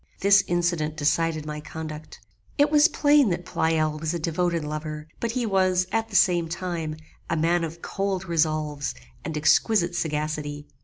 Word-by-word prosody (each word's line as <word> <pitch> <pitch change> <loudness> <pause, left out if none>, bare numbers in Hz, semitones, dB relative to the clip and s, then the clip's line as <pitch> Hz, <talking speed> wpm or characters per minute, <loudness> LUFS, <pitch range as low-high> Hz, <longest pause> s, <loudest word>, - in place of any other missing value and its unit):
This 200 0 +6
incident 170 -3 0
decided 155 +1 0
my 150 0 -5
conduct. 155 -1 -8 0.4
It 290 +1 +3
was 300 +1 +6
plain 290 - +4
that 175 0 -2
Pleyel 155 -1 0
was 160 +2 -2
a - - -2
devoted 170 0 -1
lover, 155 0 -5
but 230 -1 -2
he 250 -1 -1
was, 185 -3 +2
at 225 0 -1
the 205 - -8
same 175 -3 +3
time, 170 -3 -4 0.3
a 165 - 0
man 170 +2 +2
of 165 +1 -6
cold 195 -2 -2
resolves 155 -4 -1 0.3
and 160 -1 -4
exquisite 175 +4 +3
sagacity. 150 -3 -3
165 Hz, 160 wpm, -25 LUFS, 155-185 Hz, 0.4 s, This